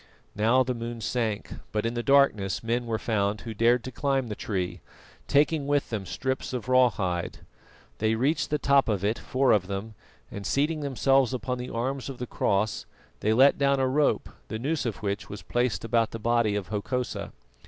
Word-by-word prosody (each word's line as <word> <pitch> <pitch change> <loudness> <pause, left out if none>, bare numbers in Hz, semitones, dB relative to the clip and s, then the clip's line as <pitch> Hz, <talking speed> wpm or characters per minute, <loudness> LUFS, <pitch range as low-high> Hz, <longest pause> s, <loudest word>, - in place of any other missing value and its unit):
Now 115 +5 +4
the 125 0 -2
moon 120 0 -5
sank, 110 -2 -2 0.2
but 105 +1 -1
in 115 - 0
the 120 - -2
darkness 120 -8 +3
men 120 +1 -1
were 115 -1 0
found 105 -2 -1
who 115 - -6
dared 115 +2 +3
to 130 - -6
climb 135 -1 0
the 105 - -3
tree, 95 -5 -3 0.5
taking 145 0 +2
with 145 -3 +1
them 100 -4 -3
strips 130 -1 -3
of 125 -1 -4
raw 130 -1 +5
hide. 90 -5 -3 0.5
They 110 +1 +2
reached 145 +6 +1
the 150 - +1
top 140 -3 +3
of 100 -2 0
it, 110 +3 0
four 130 0 +1
of 95 -4 +3
them, 100 +3 -5 0.4
and 100 - -6
seating 150 +8 0
themselves 135 -2 +2
upon 125 +1 -3
the 125 - -5
arms 130 +4 -3
of 135 - -7
the 125 - -4
cross, 105 -2 -1 0.3
they 110 - +1
let 135 +6 +5
down 140 -1 +3
a 130 - +2
rope, 145 +3 +1 0.2
the 110 - -4
noose 140 +2 -1
of 105 -3 -5
which 100 +1 -3
was 105 - -8
placed 120 -2 -1
about 115 -1 +2
the - - -6
body 115 -2 +2
of 100 -3 -3
Hokosa. 120 +4 -3
120 Hz, 195 wpm, -27 LUFS, 110-135 Hz, 0.5 s, raw